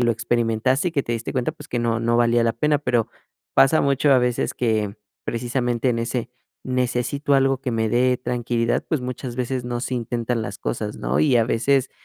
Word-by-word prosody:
lo 120 -1 +3
experimentaste, 120 - +1
y - - -6
que 140 -4 +1
te 120 - -3
diste 115 0 -3
cuenta, 130 +4 -1
pues, 150 -2 -13
que 120 - -2
no 115 -1 0
no 115 +1 +1
valía 120 0 +3
la 115 -1 +2
pena, 150 +4 +1
pero 120 -5 0 0.5
pasa 135 +4 +5
mucho 140 0 +3
a 130 - +6
veces 125 -1 0
que 110 -4 0 0.3
precisamente 120 +1 -1
en 115 -1 +1
ese 115 +1 -2 0.4
necesito 130 +3 0
algo 135 -1 +3
que 130 - -3
me 110 -1 0
dé 125 +1 +3
tranquilidad, 120 -1 -1
pues, 150 -6 0
muchas 125 0 -5
veces 125 0 -2
no 120 -1 -3
se 130 - -3
intentan 120 0 -2
las 100 -2 -5
cosas, 105 -3 -3
¿no? 65 +5 0
Y 120 +11 +4
a 115 - +4
veces 130 +3 +1
120 Hz, 205 wpm, -22 LUFS, 115-130 Hz, 0.5 s, a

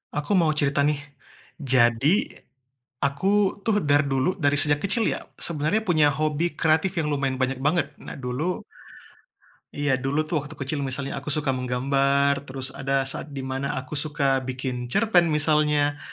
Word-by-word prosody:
Aku 150 +6 -3
mau 165 -3 +3
cerita 140 -2 +1
nih. 150 -1 0 0.6
Jadi, 130 - +2 0.7
aku 190 +8 +1
tuh 215 -2 +2
dar 145 -4 +3
dulu, 140 +5 0
dari 145 -5 +1
sejak 145 0 +3
kecil 220 +3 +1
ya, - - -2 0.2
sebenarnya 155 +5 0
punya 155 -6 +4
hobi 155 +3 -1
kreatif 160 +4 +2
yang 155 - 0
lumayan 140 -3 -1
banyak 130 +1 0
banget. 160 +4 +1
Nah - - -8
dulu, 135 +8 -2 1.1
iya 145 -1 -1
dulu 140 +4 0
tuh 155 0 -1
waktu 145 +2 -10
kecil 140 +2 -3
misalnya 135 0 -3
aku 140 - -6
suka 150 -1 +1
menggambar, 140 +2 +1
terus 130 0 -4
ada 135 0 0
saat 135 +2 -4
di 135 - -4
mana 130 +1 -3
aku 130 +2 -6
suka 145 -2 +1
bikin 130 -1 -4
cerpen 175 - +3
misalnya. 150 -1 +2
145 Hz, 155 wpm, -24 LUFS, 135-155 Hz, 1.1 s, punya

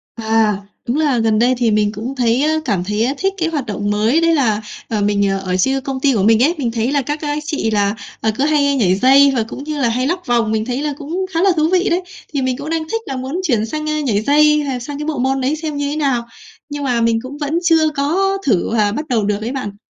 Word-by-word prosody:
À, 220 -2 +1 0.3
đúng 250 +5 0
là 290 -5 +2
gần 220 -1 +2
đây 245 +2 +3
thì 235 -2 +1
mình 210 -1 +2
cũng 230 +5 -6
thấy, 245 0 +1
a, 310 +1 +2
cảm 200 -7 0
thấy 210 +4 0
thích 390 0 0
cái 330 -2 0
hoạt 290 -6 -3
động 205 -2 -3
mới 220 +10 +2
đấy 330 0 +3
là, 220 -7 +1 0.3
ờ, 215 -2 -1
mình 200 -1 +1
ở 195 -1 -1
chia 265 +8 +1
công 265 0 -4
ty 275 0 +2
của 200 -5 +1
mình 225 +3 +4
ấy, 335 +5 +2
mình 250 -6 -1
thấy 230 +3 -1
là 285 - +2
các, 295 +3 -4
a, 295 -1 -2
chị 295 -7 -2
là, 205 -1 +1 0.3
à, 220 - +1
cứ 270 - +1
hay 285 -2 +2
nhảy 190 -8 +2
dây 270 +6 +5
và 230 - +1
cũng 245 +5 -8
như 295 -1 -4
là 235 - +2
hay 250 +3 0
lắc 355 +3 -2
vòng, 235 -3 +1
mình 220 0 0
thấy 250 +3 -2
là 300 -1 -2
cũng 330 +6 -3
khá 330 - +1
là 390 - +4
thú 310 +1 +2
vị 370 +1 +2
đấy. 350 +1 +1 0.3
Thì 280 - 0
mình 255 -1 -1
cũng 285 +2 -6
đang 325 -1 -1
thích 455 +4 -2
là 270 - -4
muốn 260 +7 -4
chuyển 235 - +1
sang, 305 +6 -4
a, 305 0 0
nhảy 220 -8 0
dây 300 +4 +4
hay 265 -3 -3
sang 280 +4 -6
cái 300 - -4
bộ 310 -3 -2
môn 265 +1 0
đấy 275 +4 0
xem 310 -1 -5
như 285 0 -1
thế 290 - -3
nào, 270 -6 0 0.5
nhưng 290 0 -5
mà 245 -4 0
mình 230 0 +2
cũng 260 +4 -8
vẫn 300 +3 -1
chưa 325 -2 +4
có 380 +8 +1
thử 205 -8 +1
và 210 -2 +2
bắt 300 +8 -4
đầu 230 -5 +1
được 205 +1 -1
ấy 230 - -3
bạn. 230 -7 -5
265 Hz, 275 wpm, -18 LUFS, 225-300 Hz, 0.5 s, dây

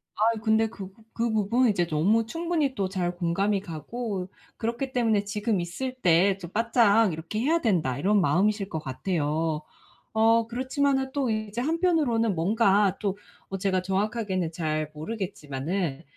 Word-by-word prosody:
아이 225 +1 +2
근데 220 0 +3
그 200 -4 -8
부 225 - -22
그 235 0 0
부분은 225 +4 +2
이제 180 -4 +1
너무 195 +9 +2
충분히 325 +1 -1
또 195 -3 0
잘 180 -2 -2
공감이 195 +3 0
가고 195 - -5 0.3
그렇기 240 +4 -2
때문에 225 -4 +2
‘지금 210 0 -1
있을 255 +10 -4
때 185 +3 +4
좀 175 -3 -8
바짝 225 -2 +3
이렇게 165 +7 -4
해야 320 +8 +2
된다.‘ 160 - +1
이런 205 +5 +3
마음이실 200 +3 +1
것 160 - -3
같아요. 155 +2 -1 0.5
어 225 +1 +4
그렇지만은 265 +2 0
또 275 -3 0
이제 215 +1 -2
한편으로는 295 - +1
뭔가 200 +2 +3
또 200 -2 -1 0.3
어 195 - -2
제가 185 -1 0
정확하게는 195 -2 -1
잘 155 -2 -2
모르겠지만은 160 -3 -4
205 Hz, 325 characters per minute, -26 LUFS, 175-230 Hz, 0.5 s, 때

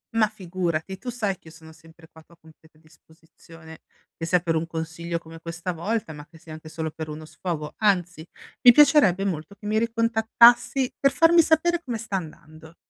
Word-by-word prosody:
Ma 220 -1 +4
figurati, 185 -3 -4
tu 245 - -7
sai 210 -6 -3
che - - -21
io 160 - -13
sono 160 -1 -15
sempre 160 0 -19
qua 160 - -18
a - - -23
tua 170 +1 -23
completa 160 -1 -22
disposizione, 160 +1 -18 0.3
che 165 - -6
sia 180 0 +2
per 170 -2 -1
un 160 +1 -2
consiglio 165 +1 -5
come 165 0 -12
questa 170 +2 -5
volta, 200 +1 -3
ma 150 0 -12
che 165 - -18
sia 160 -1 -12
anche 155 0 -11
solo 160 0 -5
per 160 -1 -7
uno 155 +1 -8
sfogo. 155 -2 -6
Anzi, 180 -6 0 0.4
mi 245 - +9
piacerebbe 235 - +4
molto 175 +1 -4
che 210 - -15
mi 215 +1 +1
ricontattassi 230 +3 +3
per 275 0 +3
farmi 335 +1 +5
sapere 330 +2 +1
come 240 -4 -4
sta 215 -2 -5
andando. 160 -1 -11
170 Hz, 195 wpm, -24 LUFS, 160-220 Hz, 0.4 s, mi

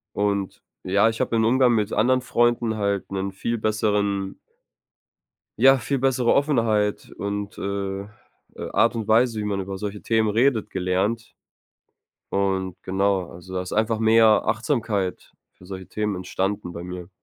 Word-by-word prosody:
Und 100 -1 -1 0.2
ja, 100 +4 +3
ich 110 - -5
habe 115 - 0
im 110 - +3
Umgang 125 +1 +4
mit 105 -1 0
anderen 130 +3 +3
Freunden 120 -2 +1
halt 100 -2 -1
'nen 95 0 -2
viel 115 +5 -3
besseren 105 -3 0 1.2
ja, 135 +1 +7
viel 135 +2 -2
bessere 130 -2 +2
Offenheit 115 -8 +1
und, 100 0 -4
äh, 100 0 -3
äh, - - -13 0.6
Art 115 - +3
und 110 -2 -4
Weise, 115 0 +3
wie - - -3
man 100 -1 -2
über 95 0 -5
solche 105 +1 -5
Themen 110 -1 +1
redet, 115 0 +2
gelernt. 95 +5 -1 0.9
Und 95 -2 -1
genau, 95 -1 0
also, 90 +2 -12
da 90 - -1
ist 90 - -8
einfach 110 +1 +1
mehr 110 -1 +4
Achtsamkeit 110 -4 -1 0.2
für 90 - -17
solche 95 -1 -8
Themen 105 -1 -2
entstanden 95 0 -3
bei 85 +1 -7
mir. 90 -1 -7
105 Hz, 155 wpm, -23 LUFS, 95-115 Hz, 1.2 s, ja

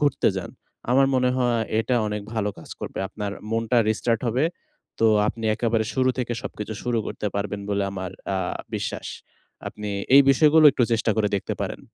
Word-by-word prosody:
ঘুরতে 145 -1 +2
যান। - - -4 0.4
আমার 135 +2 +5
মনে 125 -1 +3
হয়, 120 -2 +1 0.2
এটা 120 +3 0
অনেক 105 0 -3
ভালো 105 -2 0
কাজ 80 - -12
করবে। - - -6
আপনার 100 0 -5 0.2
মনটা 115 +2 +1
রিস্টার্ট 115 +1 0
হবে। 125 +6 +1 0.6
তো 115 - +5 0.2
আপনি 115 0 -5
একেবারে 115 -1 0
শুরু 130 -1 +3
থেকে 120 -1 -1
সবকিছু 110 -4 -6
শুরু 120 -1 0
করতে - - -4
পারবেন 100 0 -2
বলে 100 0 +1
আমার 95 -2 -5 0.2
আ - - 0 0.4
বিশ্বাস। - - -4 0.6
আপনি 105 -1 -6 0.2
এই 140 - +10
বিষয়গুলো 155 +3 +5
একটু 125 - +2
চেষ্টা 115 0 +1
করে 105 -2 +2
দেখতে 95 - -3
পারেন। - - -4
115 Hz, 175 wpm, -24 LUFS, 105-125 Hz, 0.6 s, এই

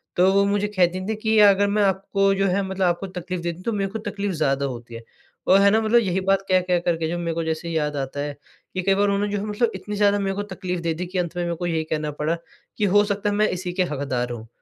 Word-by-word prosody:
तो 185 +2 +4
वो 200 0 +4
मुझे 205 +1 +1
कहती 185 -3 +1
थी 220 - -1
कि 220 0 +2
अगर 205 -1 +6
मैं 205 +1 +2
आपको 195 0 +2
जो 195 0 +1
है 190 +2 +1
मतलब 190 0 -1
आपको 175 +2 0
तकलीफ़ 180 -1 -5
देती 170 -1 -3
हूँ, 180 - -13
तो 230 - -1
मेरे 195 -1 -1
को 220 - -4
तकलीफ़ 205 -1 -3
ज़्यादा 140 -3 0
होती 120 -3 -6
है। 115 - -8 0.4
और 190 - +6
है 200 - +6
ना, 220 +1 +3
मतलब 225 +2 +4
यही 190 -4 0
बात 195 0 +4
कह-कह 185 -1 +3
करके 165 -2 -1
जो 175 - -2
मेरे 170 -1 -2
को 165 - -1
जैसे 160 +1 -3
ही 165 -1 -1
याद 150 -1 -1
आता 135 0 -4
है, 145 0 -3 0.4
कि 185 - -1
कई 195 +2 +2
बार 200 - +2
उन्होंने 200 +1 0
जो 205 - 0
है - - -4
मतलब 215 +2 0
इतनी 205 +2 -5
ज़्यादा 205 0 +3
मेरे 195 -1 -1
को 205 - -2
तकलीफ़ 180 -2 -3
दे 165 -1 0
दी, 180 +3 -4
कि 185 +2 -5
अंत 175 -1 -3
में 175 - 0
मेरे 170 0 -2
को 175 - -4
यही 165 -2 0
कहना 155 -1 -2
पड़ा, 165 +3 0 0.4
कि 210 - +1
हो 205 +1 +4
सकता 205 0 -1
है 205 - -1
मैं 215 +1 +3
इसी 180 -1 -4
के 185 +1 +1
हकदार 130 -3 -2
हूँ। 115 -1 -7
185 Hz, 285 wpm, -23 LUFS, 165-200 Hz, 0.4 s, अगर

